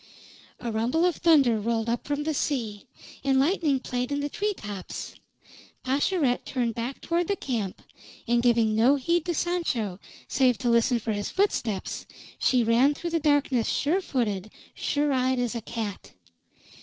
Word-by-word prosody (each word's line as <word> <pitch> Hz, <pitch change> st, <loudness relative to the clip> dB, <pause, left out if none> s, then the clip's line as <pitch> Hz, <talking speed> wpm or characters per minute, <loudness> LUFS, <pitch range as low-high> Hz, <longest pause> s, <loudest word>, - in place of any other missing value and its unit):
A 240 Hz, -2 st, -4 dB
rumble 240 Hz, +10 st, +1 dB
of 355 Hz, -3 st, +1 dB
thunder 280 Hz, -10 st, +4 dB
rolled 225 Hz, +1 st, -1 dB
up 235 Hz, +1 st, -2 dB
from 290 Hz, 0 st, -1 dB
the 315 Hz, +1 st, -1 dB
sea, 230 Hz, -8 st, -2 dB, 0.4 s
and 270 Hz, -1 st, +3 dB
lightning 300 Hz, -2 st, +2 dB
played 250 Hz, +1 st, -3 dB
in 285 Hz, -, 0 dB
the 290 Hz, 0 st, -2 dB
tree 415 Hz, +5 st, -1 dB
tops. 205 Hz, -, -7 dB, 0.7 s
Pascherette 275 Hz, 0 st, +1 dB
turned 240 Hz, -3 st, -1 dB
back 235 Hz, +4 st, -5 dB
toward 340 Hz, 0 st, 0 dB
the 400 Hz, -, +1 dB
camp, 225 Hz, -, -4 dB, 0.4 s
and 240 Hz, 0 st, +3 dB
giving 235 Hz, -3 st, +3 dB
no 235 Hz, +6 st, +5 dB
heed 335 Hz, +4 st, 0 dB
to 345 Hz, -2 st, -1 dB
Sancho 255 Hz, -, -1 dB, 0.3 s
save 255 Hz, -3 st, +3 dB
to 245 Hz, -2 st, 0 dB
listen 235 Hz, +1 st, +3 dB
for 225 Hz, 0 st, -3 dB
his 205 Hz, 0 st, -3 dB
footsteps, 240 Hz, -, -1 dB, 0.3 s
she 250 Hz, -2 st, +3 dB
ran 240 Hz, +6 st, +4 dB
through 340 Hz, +2 st, -4 dB
the 330 Hz, -, +1 dB
darkness 285 Hz, -6 st, +2 dB
sure 335 Hz, +7 st, +1 dB
footed, 215 Hz, -, -2 dB, 0.2 s
sure 290 Hz, -1 st, 0 dB
eyed 260 Hz, 0 st, +1 dB
as 245 Hz, -1 st, -1 dB
a 235 Hz, -, -4 dB
cat. 220 Hz, -3 st, -6 dB
255 Hz, 165 wpm, -26 LUFS, 230-295 Hz, 0.7 s, no